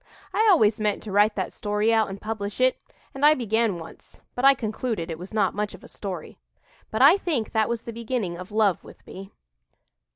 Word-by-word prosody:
"I 445 - +3
always 225 - +4
meant 210 -1 -1
to 210 - -7
write 205 +2 +3
that 190 -3 -3
story 210 +2 0
out 220 -2 +2
and 195 0 -7
publish 210 -1 -5
it, 255 0 +2 0.3
and 270 - -6
I 300 +1 +7
began 225 - 0
once; 165 - -13
but 245 - -4
I 275 0 +7
concluded 220 -6 -3
it 160 - -6
was 180 +2 -9
not 215 -2 +1
much 210 0 -3
of - - -17
a - - -11
story. 185 - -7 0.5
"But 220 +4 +1
I 310 +8 +8
think 295 - -2
that 220 -1 +1
was 235 -1 -3
the 235 - -7
beginning 230 -6 -3
of 180 +3 -9
love 210 -4 +1
with - - -16
me." 195 +1 -10
215 Hz, 215 wpm, -25 LUFS, 200-235 Hz, 0.5 s, I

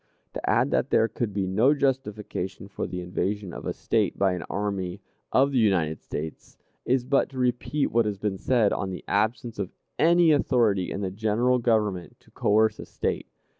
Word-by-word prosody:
To - - -3
add - - +3
that - - +1
there 115 - +4
could 115 0 -3
be 100 -1 -1
no 110 +10 +3
justification 105 -9 -2
for 100 - -4
the 90 -1 -5
invasion 90 +2 -3
of - - -7
a - - 0
State - - 0
by 95 -1 +2
an 90 - -4
army 100 -2 -3 0.3
of 135 +2 +4
the 130 - +2
United 85 -8 +1
States, 80 +1 -7 0.3
is 125 0 +1
but 135 +1 +2
to 135 - -11
repeat 125 +3 0
what 115 -1 +3
has 105 -2 -2
been 95 -1 -2
said, 120 -5 +2
on 95 - -2
the 90 - -6
absence 110 +3 -1
of - - -2 0.3
any 170 +1 +5
authority 120 -10 +2
in 100 - -3
the 95 -2 -2
General 110 +5 +1
Government 105 -7 0
to - - -24
coerce 110 +1 +2
a - - -6
State. - - -3
105 Hz, 190 wpm, -26 LUFS, 95-125 Hz, 0.3 s, any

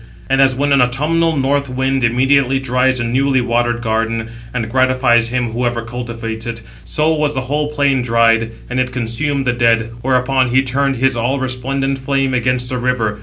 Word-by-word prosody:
And 135 0 +4
as 135 -1 +3
when 145 +2 0
an 140 - +4
autumnal 155 +6 +1
north 140 +1 0
wind 130 +1 -1
immediately 130 +3 +2
dries 130 0 +1
a - - -1
newly 130 +3 +1
watered 120 0 0
garden, 115 0 -1 0.2
and 115 -3 -3
gratifies 130 -1 +2
him 125 -1 -1
whoever 120 0 -2
cultivates 115 -1 -6
it, 115 -1 -5 0.2
so 155 +1 +1
was 150 -1 -1
the 130 - -1
whole 145 +3 -2
plain 140 -3 +1
dried, 115 -1 +2 0.2
and 125 +1 -2
it 125 0 -1
consumed 130 +4 -1
the 125 - +1
dead; 115 -1 +1
whereupon 130 +1 +1
he 130 +2 +2
turned 135 +1 0
his 130 +1 +1
all 125 +4 -1
resplendent 135 +1 -2
flame 135 0 -1
against 125 0 0
the 125 - -2
river. 115 -4 -1
125 Hz, 180 wpm, -17 LUFS, 120-135 Hz, 0.2 s, And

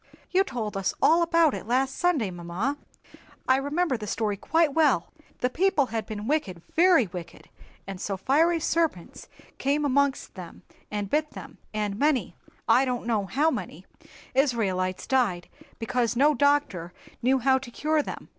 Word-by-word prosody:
"You 375 +1 +4
told 235 - -5
us 195 -1 -1
all 330 +2 +4
about 335 -2 +3
it - - -6
last 260 +3 +1
Sunday, 305 - +1
mamma; 175 +10 -3 0.7
I 260 - +5
remember 285 +1 0
the 210 -2 -7
story 210 0 -1
quite 320 +8 +1
well. 285 - +2 0.3
The 250 - +2
people 345 -3 +2
had 225 -1 -2
been 210 -1 -6
wicked, 210 - -2
very 340 -6 +5
wicked, 175 -2 -10 0.4
and 195 -1 -7
so 195 -2 -3
fiery 320 - +2
serpents 320 - -2 0.3
came 290 +2 +1
amongst 280 0 +1
them - - -10 0.3
and 205 -1 -3
bit 300 +7 0
them; - - -11
and 210 -1 -3
many—I 275 -2 0
don't 250 -3 -2
know 215 -4 0
how 290 - +2
many—Israelites 205 -16 -3
died, 230 -10 0 0.3
because 235 0 -1
no 290 +5 +4
doctor 285 - +1 0.3
knew 260 +3 +3
how 265 +1 +3
to 265 -2 -10
cure 305 +5 0
them." - - -8
260 Hz, 155 wpm, -26 LUFS, 205-300 Hz, 0.7 s, I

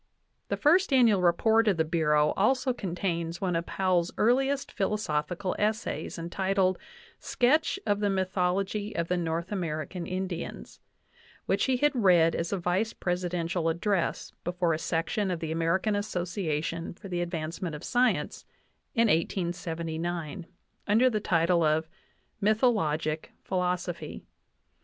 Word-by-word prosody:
The - - -2
First 345 +4 +4
Annual 235 -7 +5
Report 220 +6 +3
of 195 -4 +3
the 160 - +2
Bureau 150 -2 +2
also 255 +5 +2
contains 170 -5 -3
one 180 -3 -1
of 165 0 -2
Powell's 185 -2 +1
earliest 270 +4 +2
philosophical 185 -3 -1
essays, 215 +2 -1
entitled 185 +2 0 0.4
"Sketch 300 +9 +2
of 205 0 +1
the 205 -1 +1
mythology 195 +2 -1
of 170 -1 -1
the 180 - +1
North 170 +1 -2
American 170 -2 -3
Indians," 185 -2 -5 0.7
which - - +1
he 260 -1 +2
had 295 +3 +3
read 180 -9 +4
as 165 0 -2
a 200 - 0
vice 185 +5 0
presidential 175 -2 -1
address 175 +2 -1
before 175 -1 0
a 155 - -2
section 165 +6 -1
of 175 -2 -2
the 160 -1 -4
American 170 +6 +1
Association 175 -5 -2
for 195 - -11
the 175 -2 -2
Advancement 165 -1 -4
of 150 - -9
Science 250 +1 +1 0.5
in 230 - +3
1879, 170 -2 -2 0.4
under 230 +5 +4
the 215 - 0
title 170 -2 +2
of 155 +1 +2 0.5
"Mythologic 195 - +1
Philosophy." 180 -2 -2
180 Hz, 130 wpm, -28 LUFS, 165-205 Hz, 0.7 s, Annual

